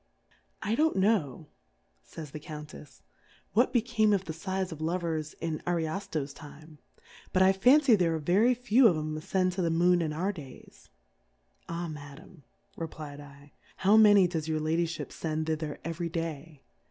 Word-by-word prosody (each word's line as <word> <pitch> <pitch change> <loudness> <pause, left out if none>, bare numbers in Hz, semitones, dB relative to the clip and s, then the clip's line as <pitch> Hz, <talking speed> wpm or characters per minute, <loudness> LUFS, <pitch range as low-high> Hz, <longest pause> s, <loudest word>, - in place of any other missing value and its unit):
I 215 +3 0
don'^t 315 +4 +2
know, 190 - +1 0.6
fays 150 - -10
the 155 - -7
Count 150 -1 -9
efy 150 - -13 0.5
what 240 +6 +3
became 230 -3 +2
of 190 -1 0
the 160 - -5
Sighs 190 +3 -3
of 160 -1 -8
Lovers 160 -2 -2
in 160 -2 -2
QArio/io\ 165 -3 -3
Time, 155 0 -13 0.5
but 185 - +4
I 190 +1 +5
fan 255 +10 +5
cy 265 -4 +5
there 170 -4 +1
are - - -1
very 195 +11 +3
few 245 +1 +4
of 175 -7 +2
'em 155 0 -3
afcend 185 +4 0
to 185 - -2
the 170 - +1
Moon 175 +2 +3
in 160 -2 -1
our 180 +6 -1
Days. 140 -8 -13 0.8
Ah, 170 +1 -3
Madam, 150 +2 -11 0.4
refifdl^ 145 -3 -9 0.3
how 200 +3 +4
many 205 -3 +7
does 160 -3 -4
Your 155 -1 -1
Lady 165 +2 0
fliip 165 - -6
fend 155 -1 -3
thither 155 -2 -3
eveiy 165 0 -4
Day? 160 -3 -5
165 Hz, 165 wpm, -29 LUFS, 155-190 Hz, 0.8 s, many